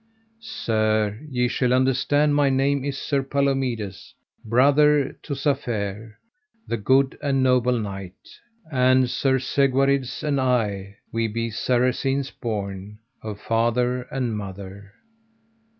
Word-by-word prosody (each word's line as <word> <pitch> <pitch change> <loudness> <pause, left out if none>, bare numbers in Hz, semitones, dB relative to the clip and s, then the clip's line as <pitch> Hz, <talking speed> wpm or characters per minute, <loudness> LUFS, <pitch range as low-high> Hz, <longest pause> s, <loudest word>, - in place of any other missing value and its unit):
Sir, 110 -1 +1
ye 125 -2 +1
shall 125 0 0
understand 135 +3 +2
my 145 -1 +3
name 135 +1 +1
is 140 -1 -3
Sir 140 0 -1
Palomides, 135 -7 -2 0.3
brother 140 +4 +3
to 140 - -5
Safere, 115 -7 -2 0.5
the 115 - -1
good 130 +6 +2
and 135 -2 +1
noble 125 -1 +3
knight. 95 -4 -8 0.3
And 130 -1 +4
Sir 130 +2 +1
Segwarides 135 0 +1
and 145 -3 0
I, 105 -6 -1 0.2
we 115 0 0
be 115 +1 -3
Saracens 130 +4 0
born, 100 -2 -5 0.2
of 105 -2 -6
father 120 +3 0
and 125 -4 -2
mother. 100 0 -8
125 Hz, 115 wpm, -23 LUFS, 110-135 Hz, 0.5 s, And